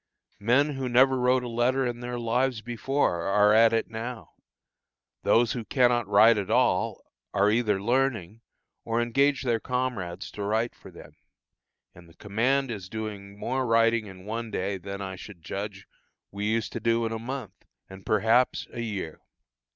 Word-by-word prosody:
Men 130 +8 +3
who 135 -2 -3
never 130 +2 +5
wrote 125 0 +2
a - - -4
letter 125 +3 +1
in 120 -1 -3
their 120 0 -5
lives 120 0 0
before, 120 -5 -1
are 105 +1 +4
at 115 +1 +6
it 115 -1 0
now; 115 +1 -7 0.9
those 115 -1 +3
who 120 - -3
cannot 120 -2 +2
write 110 +1 +6
at 100 0 -4
all, 115 -3 +1 0.3
are 100 +1 +4
either 110 -3 +1
learning, 115 -3 -1 0.4
or 115 0 -1
engage 135 +5 +2
their 120 -3 +1
comrades 115 -8 -3
to 105 - -8
write 110 +3 0
for - - -14
them, - - -14 0.8
and 85 -1 -16
the 85 - -20
command 125 +6 0
is 95 -4 -7
doing 100 -2 -6
more 130 +5 -2
writing 115 -1 +3
in 95 -1 -12
one 115 +2 -4
day 100 -1 -3
than, 100 +1 -6
I 95 -1 -6
should 95 -3 -12
judge, 100 +2 -6 0.5
we 100 +1 -4
used 115 -1 -1
to - - -3
do 115 0 +1
in 115 - -2
a 115 - -3
month, 130 -1 -7 0.2
and, 95 0 -12
perhaps, 115 +4 +2
a 120 - -4
year. 100 -8 -5
115 Hz, 170 wpm, -27 LUFS, 100-125 Hz, 0.9 s, at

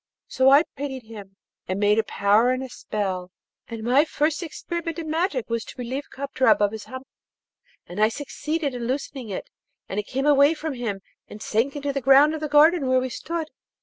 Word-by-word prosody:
So 260 0 +3
I 280 +3 +7
pitied 265 -2 -5
him, 205 -3 -11 0.3
and 185 +1 -2
made 210 +1 +3
a - - +2
powder 210 +4 +3
and 255 +1 0
a 260 - -7
spell, 190 -6 -4 0.4
and 230 -2 -7
my 255 +5 +4
first 310 +1 -1
experiment 340 0 -5
in 320 -2 -4
magic 320 - -1
was 230 -1 -2
to - - -11
relieve 255 +3 -5
Kadrab 270 -1 +2
of 205 -1 +2
his 220 -1 -7
hump, 260 +1 -9 0.8
and 175 +3 -8
I 215 - +5
succeeded 290 +3 -3
in 240 -1 -4
loosening 260 -2 -4
it, 190 - -6 0.4
and 195 - -3
it 210 - -5
came 270 +2 -2
away 290 +1 +5
from 310 -1 -4
him, 225 -6 -4 0.3
and 210 - -10
sank 230 +6 -1
into 285 -1 -3
the 275 - -2
ground 275 +4 +6
of 315 - -5
the 305 - -2
garden 295 0 +5
where 255 0 +3
we 255 0 -3
stood. 320 +5 -5
260 Hz, 205 wpm, -24 LUFS, 220-295 Hz, 0.8 s, I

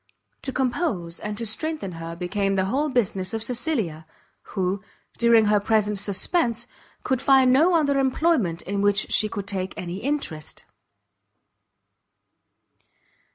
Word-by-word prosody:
To 265 - -2
compose 245 - -1
and 210 0 -5
to 230 - -2
strengthen 305 -1 -3
her 165 0 -7
became 195 +3 -1
the 190 -1 +1
whole 280 +9 0
business 200 -6 0
of 220 - -1
Cecilia; 225 - -2 0.5
who, 190 +1 0 0.4
during 235 -2 +5
her 210 0 +4
present 210 -1 +1
suspense, 230 - 0 0.4
could 260 -1 0
find 265 -2 +5
no 330 +7 +5
other 285 -4 +2
employment 260 - +1
in 200 +1 -2
which 200 -1 +2
she 215 - +3
could 200 -3 -5
take 190 -1 -3
any 175 0 -5
interest. 210 - -3
215 Hz, 130 wpm, -24 LUFS, 190-265 Hz, 0.5 s, during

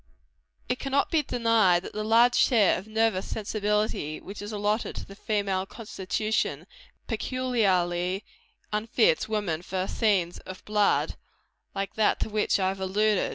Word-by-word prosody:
It 250 +1 -1
cannot 275 +1 0
be 320 - +3
denied 230 -9 +2
that - - -8
the 215 - -3
large 230 +3 +5
share 225 -8 +4
of 190 - -12
nervous 220 -3 +1
sensibility 210 -6 -1
which 200 +2 -9
is 205 +1 -6
allotted 210 +1 -1
to - - -6
the 195 - -12
female 200 -2 -1
constitution, 215 0 -2 0.4
peculiarly 195 -7 0 0.5
unfits 230 - +2
woman 200 -7 -1
for 185 +1 -3
scenes 190 -6 +1
of 185 - -10
blood, 210 -1 +1 0.6
like 195 0 -3
that 215 - +3
to - - -1
which 210 -1 +1
I 190 -1 +2
have 195 0 -4
alluded. 205 +2 +1
210 Hz, 145 wpm, -27 LUFS, 190-225 Hz, 0.6 s, large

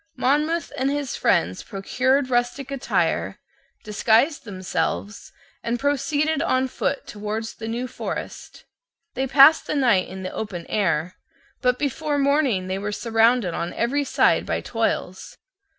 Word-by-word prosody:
Monmouth 305 +5 +1
and 265 +2 +1
his 285 -2 -2
friends 90 +3 +1
procured 260 +7 0
rustic 245 +3 -1
attire, 275 -1 -1 0.5
disguised 225 +8 +2
themselves, 200 +1 -3 0.3
and 235 +1 -1
proceeded 290 +3 0
on 260 0 +1
foot 275 +2 -2
towards 215 +2 -5
the 225 - -7
New 240 +3 -3
Forest. - - -7 0.5
They 265 +1 -1
passed 275 +4 +6
the - - -1
night 240 -10 +3
in 190 0 -8
the 185 - -5
open 180 -6 -5
air: 175 -4 0 0.4
but 250 -1 +2
before 295 +2 -1
morning 280 -9 +2
they 190 +1 -2
were 205 +1 -3
Surrounded 225 -2 +2
on 170 +1 -3
every 275 +5 0
side 270 - +2
by - - -2
toils. 225 -5 -3
245 Hz, 135 wpm, -23 LUFS, 210-275 Hz, 0.5 s, passed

